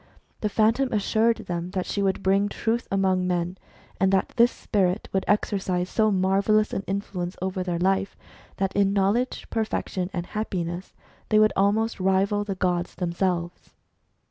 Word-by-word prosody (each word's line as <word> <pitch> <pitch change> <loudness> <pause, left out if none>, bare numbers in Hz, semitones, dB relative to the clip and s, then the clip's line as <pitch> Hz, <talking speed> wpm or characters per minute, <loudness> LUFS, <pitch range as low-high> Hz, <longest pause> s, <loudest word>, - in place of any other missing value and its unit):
The 210 - -1
Phantom 225 +5 +2
assured 220 +2 +2
them 175 -1 -3
that 185 - 0
she 200 - -2
would 195 -1 0
bring 195 +2 +2
Truth 230 +3 -1
among 190 -2 +1
men, 175 +1 -1 0.4
and 190 0 +3
that 190 -1 +1
this 240 0 +5
spirit 190 -1 -1
would 190 - +1
exercise^marvellous 200 +1 +1
an 195 - -2
influence 190 -2 -3
over 185 0 -2
their 180 -2 -2
life, 195 +2 0 0.4
that 195 0 -1
in 200 -1 +3
knowledge, 205 +6 0
perfection, 215 -4 -2
and 175 -2 -3
happiness 180 -4 -4 0.3
they 215 - +4
would 215 0 +5
almost 215 +3 +2
(,■ 185 - -5
rival 195 +2 +2
the 200 -2 -4
gods 180 -2 -1
themselves. 175 0 -2
195 Hz, 150 wpm, -25 LUFS, 185-210 Hz, 0.4 s, this